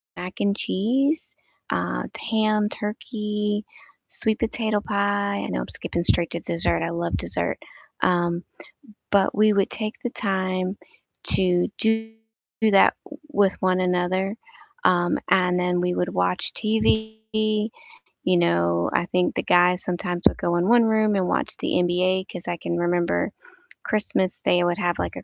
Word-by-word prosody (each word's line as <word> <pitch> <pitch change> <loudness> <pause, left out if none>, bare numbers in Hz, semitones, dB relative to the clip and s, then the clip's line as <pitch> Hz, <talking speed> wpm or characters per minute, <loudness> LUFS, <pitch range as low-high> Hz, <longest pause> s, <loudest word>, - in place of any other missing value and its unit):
mac 180 +1 -6
and 200 0 +1
cheese, 270 +13 0 0.4
uh, - - -1 0.3
ham, 215 -1 +2
turkey, 210 -1 -3 0.4
sweet 220 -1 -1
potato 220 -2 0
pie, 200 0 0
I - - -4
know 60 - -2
I'm - - -5
skipping 170 - -4
straight 170 -1 +2
to 170 - -3
dessert, 85 - -1
I 85 - -1
love 85 0 -2
dessert, - - -2 0.4
um, 175 0 +1 0.7
but 200 -1 +3
we 215 0 +4
would 200 -1 +2
take 215 0 -4
the 245 - -1
time 185 -2 -1 0.5
to 180 -2 +2
do 225 0 0 0.5
that 210 -3 +5
w 295 - -11
with 200 -7 +3
one 185 -1 +2
another, 185 +2 0 0.5
um, 175 -1 +3
and 180 -1 +3
then 180 0 +1
we 180 0 0
would 180 - 0
watch 90 0 +1
TV, 220 0 0
you 215 0 -1 0.5
know, 85 - +2
I 175 - +2
think 180 0 0
the - - -1
guys 180 +1 +4
sometimes 175 0 -3
would - - -1
go 170 - 0
in 175 +1 +1
one 240 +1 +6
room 220 -2 +2
and 185 -2 +1
watch - - -1
the - - -2
NBA 185 +2 +1
'cause 175 - -8
I 175 - -2
can 170 - -3
remember 175 - 0 0.5
Christmas 200 -3 -1
day 175 0 +3
would 175 0 +1
have, 175 -1 0
like, - - -2
a - - -8
185 Hz, 155 wpm, -24 LUFS, 175-215 Hz, 0.7 s, one